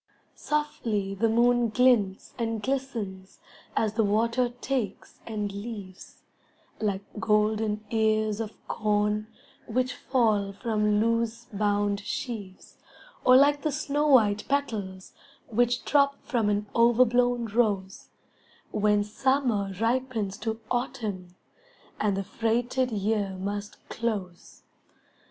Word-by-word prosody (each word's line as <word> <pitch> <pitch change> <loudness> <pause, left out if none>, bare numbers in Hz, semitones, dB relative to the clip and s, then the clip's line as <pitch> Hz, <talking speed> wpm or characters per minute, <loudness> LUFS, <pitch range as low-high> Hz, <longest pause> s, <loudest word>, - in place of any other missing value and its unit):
Softly 230 -10 -2
the 225 +4 +1
moon 240 +1 +3
glints 215 -5 +2
and 225 -2 -2
glistens 230 -9 -4 0.4
As 215 -2 +1
the 225 0 +2
water 230 +4 +2
takes 245 -8 -3
and 210 -3 -3
leaves, 200 -3 -8 0.6
Like 200 -2 -1 0.2
golden 215 0 +1
ears 215 -1 +1
of 220 -1 -4
corn 210 0 0 0.4
Which 250 +2 0
fall 215 -7 +1
from 210 -1 +1
loose 230 +1 0
bound 205 0 +1
sheaves, 205 -2 -6 0.5
Or 255 - +7
like 285 +1 +4
the 305 - 0
snow 290 +2 0
white 215 -7 +4
petals 210 -10 -2 0.4
Which 240 +2 +1
drop 280 -1 +3
from 235 -7 +1
an 205 0 0
overblown 245 +1 +4
rose, 205 -4 -1 0.6
When 210 -1 +2
Summer 230 -2 0
ripens 230 -4 0
to 220 0 -3
Autumn 215 -8 -3 0.6
And 205 -2 +1
the 195 - -1
freighted 240 +5 0
year 205 -2 -1
must 205 +2 -4
close. 200 -7 -4
220 Hz, 110 wpm, -27 LUFS, 205-245 Hz, 0.6 s, Or